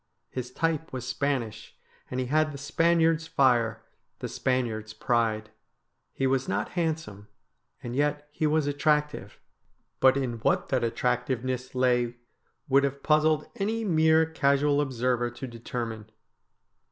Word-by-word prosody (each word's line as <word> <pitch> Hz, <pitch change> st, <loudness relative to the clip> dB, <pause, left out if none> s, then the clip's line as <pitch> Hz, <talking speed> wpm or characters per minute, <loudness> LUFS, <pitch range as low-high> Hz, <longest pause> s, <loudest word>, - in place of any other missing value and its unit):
His 125 Hz, -1 st, -4 dB
type 160 Hz, +3 st, -1 dB
was 125 Hz, -1 st, -5 dB
Spanish, 125 Hz, -5 st, -2 dB, 0.3 s
and 125 Hz, -, -3 dB
he 130 Hz, -, 0 dB
had 155 Hz, +4 st, +2 dB
the 140 Hz, -, -7 dB
Spaniard's 165 Hz, +2 st, +2 dB
fire, 120 Hz, -6 st, +2 dB, 0.3 s
the -, -, -5 dB
Spaniard's 115 Hz, -4 st, -2 dB
pride. 110 Hz, -2 st, 0 dB, 0.6 s
He 135 Hz, -, -2 dB
was 135 Hz, 0 st, +1 dB
not 100 Hz, +2 st, -1 dB
hand 165 Hz, -3 st, 0 dB
some, 105 Hz, -7 st, -12 dB, 0.6 s
and 120 Hz, 0 st, -5 dB
yet 145 Hz, +1 st, 0 dB
he 155 Hz, +1 st, 0 dB
was 155 Hz, 0 st, +2 dB
attractive; 150 Hz, -6 st, 0 dB, 0.6 s
but 130 Hz, 0 st, +5 dB
in 125 Hz, -4 st, -2 dB
what -, -, +1 dB
that 130 Hz, -3 st, +1 dB
attractive 125 Hz, +1 st, 0 dB
ness 130 Hz, 0 st, -4 dB
lay 125 Hz, -1 st, +2 dB, 0.5 s
would 140 Hz, +1 st, +4 dB
have 140 Hz, 0 st, -2 dB
puzzled 155 Hz, 0 st, +3 dB
any 220 Hz, +3 st, -1 dB
mere 160 Hz, -3 st, +4 dB
casual 145 Hz, -2 st, +2 dB
observer 125 Hz, -3 st, 0 dB
to 120 Hz, +3 st, -8 dB
determine. 115 Hz, -2 st, -6 dB
130 Hz, 140 wpm, -27 LUFS, 120-150 Hz, 0.6 s, but